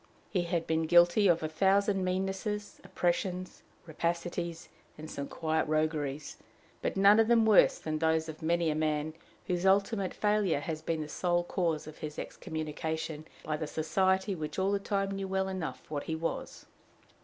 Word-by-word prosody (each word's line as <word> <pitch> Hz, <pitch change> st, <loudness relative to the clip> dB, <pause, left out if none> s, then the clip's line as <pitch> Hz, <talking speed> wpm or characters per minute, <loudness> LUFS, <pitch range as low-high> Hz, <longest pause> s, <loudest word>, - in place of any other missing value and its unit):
He 180 Hz, -3 st, 0 dB
had 170 Hz, -1 st, -1 dB
been 160 Hz, 0 st, 0 dB
guilty 175 Hz, +4 st, +6 dB
of 170 Hz, -2 st, +3 dB
a -, -, 0 dB
thousand 195 Hz, +4 st, +2 dB
meannesses, 195 Hz, +3 st, -2 dB
oppressions, 180 Hz, 0 st, -2 dB, 0.2 s
rapacities, 170 Hz, +1 st, -3 dB, 0.3 s
and 155 Hz, +1 st, -8 dB
some 140 Hz, 0 st, -4 dB
quiet 160 Hz, 0 st, -1 dB
rogueries, 155 Hz, -2 st, -1 dB, 0.4 s
but -, -, -2 dB
none 200 Hz, +2 st, +7 dB
of 225 Hz, -, +4 dB
them 230 Hz, -1 st, +5 dB
worse 215 Hz, -2 st, +6 dB
than 155 Hz, -1 st, -3 dB
those 160 Hz, 0 st, +2 dB
of 160 Hz, -1 st, -8 dB
many 170 Hz, 0 st, +1 dB
a -, -, -2 dB
man 155 Hz, 0 st, 0 dB, 0.3 s
whose 180 Hz, -2 st, -1 dB
ultimate 195 Hz, 0 st, +2 dB
failure 210 Hz, -8 st, +1 dB
has 155 Hz, 0 st, -4 dB
been 160 Hz, 0 st, -2 dB
the 150 Hz, -, -4 dB
sole 175 Hz, +2 st, 0 dB
cause 170 Hz, -4 st, -1 dB
of 155 Hz, 0 st, -11 dB
his 150 Hz, -1 st, -6 dB
excommunication 160 Hz, -1 st, -4 dB, 0.2 s
by 155 Hz, -, -2 dB
the 155 Hz, -1 st, -4 dB
society 190 Hz, +6 st, +1 dB
which 155 Hz, -3 st, -5 dB
all 190 Hz, +1 st, +1 dB
the 200 Hz, -, +1 dB
time 195 Hz, 0 st, -1 dB
knew 195 Hz, 0 st, -3 dB
well 190 Hz, 0 st, 0 dB
enough 185 Hz, -4 st, -4 dB
what 145 Hz, -2 st, -4 dB
he 160 Hz, -, -2 dB
was. 165 Hz, +1 st, -4 dB
170 Hz, 170 wpm, -31 LUFS, 155-190 Hz, 0.4 s, none